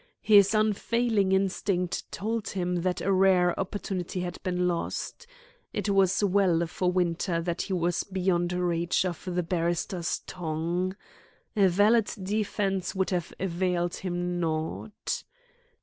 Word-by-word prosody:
His 205 -1 +6
unfailing 215 -1 +2
instinct 190 -2 0
told 220 +1 -2
him 180 -2 -1
that 180 +1 -1
a 195 - +1
rare 185 -2 +4
opportunity 190 -2 -3
had 180 0 -5
been 180 -2 0
lost. 180 - -3 0.5
It - - -2
was 195 0 +3
well 185 -4 +3
for 180 +2 -1
Winter 175 -1 0
that 170 +1 -2
he 195 - -3
was 175 -1 0
beyond 180 -2 0
reach 175 0 +1
of 175 -3 -4
the 180 -1 -1
barrister's 170 0 -1
tongue. 175 +2 -2 0.6
A 200 -2 +5
valid 205 +5 +4
defence 195 -1 -1
would 190 0 0
have 175 -3 -1
availed 180 -1 -1
him 175 -1 -2
naught. 160 +5 -3
180 Hz, 130 wpm, -28 LUFS, 175-195 Hz, 0.6 s, His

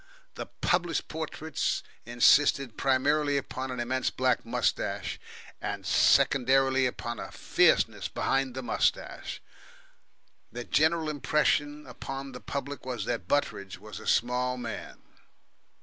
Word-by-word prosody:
The - - -6
published 175 -1 0
portraits 160 -1 -2 0.2
insisted 120 0 +4
primarily 145 +2 +2
upon 130 -1 -4
an 125 -1 -4
immense 130 +2 0
black 130 -1 +1
moustache, - - -1 0.4
and - - -4
secondarily 135 0 +4
upon 120 -1 -5
a - - -7
fierceness - - +2
behind 135 -1 -1
the 130 - -4
moustache. - - -1 1.1
The 120 - -5
general 160 +4 +2
impression 150 0 0
upon 135 +2 -7
the 125 - -9
public 140 0 -5
was 125 -5 -4
that 115 -8 -3
Butteridge, 100 -8 -1
was 105 +1 -9
a - - -10
small 125 +1 +1
man. 120 -2 -7
130 Hz, 120 wpm, -28 LUFS, 125-145 Hz, 1.1 s, insisted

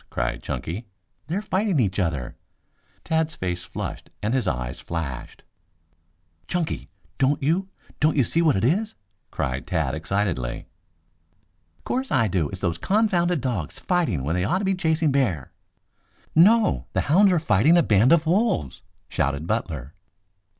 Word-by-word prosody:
cried - - -2
Chunky. 100 +8 -5 0.4
"They're 185 +6 -2
fighting 195 -4 +1
each 100 -5 +1
other." 70 -9 -2 0.7
Tad's 160 -1 0
face 90 -1 -3
flushed - - -6
and 110 +3 0
his 130 -2 +1
eyes 60 -1 -2
flashed. 75 -7 -5 1.0
"Chunky, 175 - -2 0.3
don't 135 +1 +2
you 180 +7 +1 0.3
don't 155 +1 +2
you 135 - +5
see 165 +8 +1
what 155 -4 +4
it 95 - 0
is?" 205 - +1 0.3
cried 70 +6 -3
Tad 80 -7 0
excitedly. 80 -6 -2 1.2
"'Course 260 +1 -2
I 115 - +3
do. 85 -6 0
It's 95 0 -7
those 85 -3 -1
confounded 180 - +2
dogs 110 - -3
fighting 165 - 0
when 75 +4 -1
they 90 +1 0
ought 105 - +1
to 195 - -2
be 195 - +2
chasing 160 -4 +1
bear." 105 - 0 0.8
"No! 210 +6 +4
The - - +2
hounds 190 +6 +4
are 180 - +3
fighting 155 - +4
a 170 - +5
band 105 +4 +4
of 165 -1 +5
wolves!" 175 - +1 0.3
shouted 70 +3 -1
Butler. 80 - -3
125 Hz, 150 wpm, -24 LUFS, -, 1.2 s, you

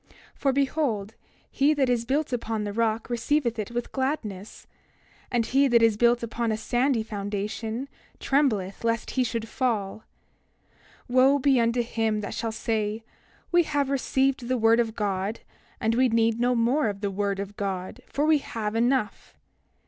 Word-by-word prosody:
For 275 - 0
behold, 265 -7 0 0.4
he 290 +2 +3
that 275 -2 +2
is 240 -2 0
built 280 +2 -1
upon 225 -3 -2
the 205 -1 -4
rock 225 0 0
receiveth 240 -1 0
it 210 - -3
with 240 0 -4
gladness; 225 -8 -4 0.6
and 235 -2 +1
he 275 +3 +3
that 235 -2 +4
is 225 -2 +4
built 235 +2 +3
upon 230 0 -2
a 215 - -1
sandy 240 +1 +1
foundation 215 +4 -4 0.3
trembleth 220 -10 0
lest 230 0 -1
he 260 - +1
shall 230 -1 -2
fall. 220 -3 -2 1.0
28:29 245 - -5
Wo 270 +2 +6
be 270 -2 +3
unto 235 +1 +1
him 225 -2 -1
that 205 - -5
shall 225 -1 -2
say: 220 -1 -2 0.5
We 350 0 +5
have 290 -4 -1
received 265 -2 0
the 255 0 +1
word 225 0 +4
of 225 -2 0
God, 200 0 -2 0.4
and 225 -1 +1
we 255 +2 +3
need 230 0 +2
no 245 +1 +2
more 240 +4 +2
of 200 -1 -6
the 200 -2 -1
word 200 0 -1
of 200 +1 -5
God, 190 -2 -4
for 290 - -1
we 310 -1 +4
have 215 -5 -4
enough! 240 -1 0
230 Hz, 170 wpm, -26 LUFS, 215-260 Hz, 1.0 s, Wo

